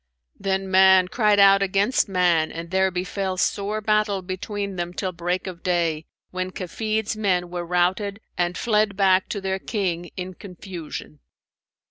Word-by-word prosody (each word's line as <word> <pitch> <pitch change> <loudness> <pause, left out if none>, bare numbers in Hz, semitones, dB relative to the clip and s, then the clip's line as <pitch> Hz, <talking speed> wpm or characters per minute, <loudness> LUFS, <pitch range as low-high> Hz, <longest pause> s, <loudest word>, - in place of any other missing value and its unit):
Then 190 0 -1
man 190 -1 +6
cried 210 -2 +3
out 195 0 +7
against 195 +4 +1
man 175 -4 +2
and 165 +1 -7
there 190 0 +3
befell 185 +1 -3
sore 205 +3 -1
battle 210 -2 +1
between 200 +2 -4
them 175 0 -4
till 190 -2 -2
break 175 +1 -2
of 180 -3 -7
day, 165 -3 0 0.2
when 185 0 -3
Kafid's 215 +4 -3
men 180 -5 0
were 175 -1 -4
routed 185 +4 0 0.2
and 175 0 -1
fled 210 -3 +1
back 190 -1 +3
to 205 - -3
their 190 0 -2
King 180 -6 -2
in 185 0 -5
confusion. 175 -5 -9
190 Hz, 150 wpm, -23 LUFS, 180-200 Hz, 0.2 s, out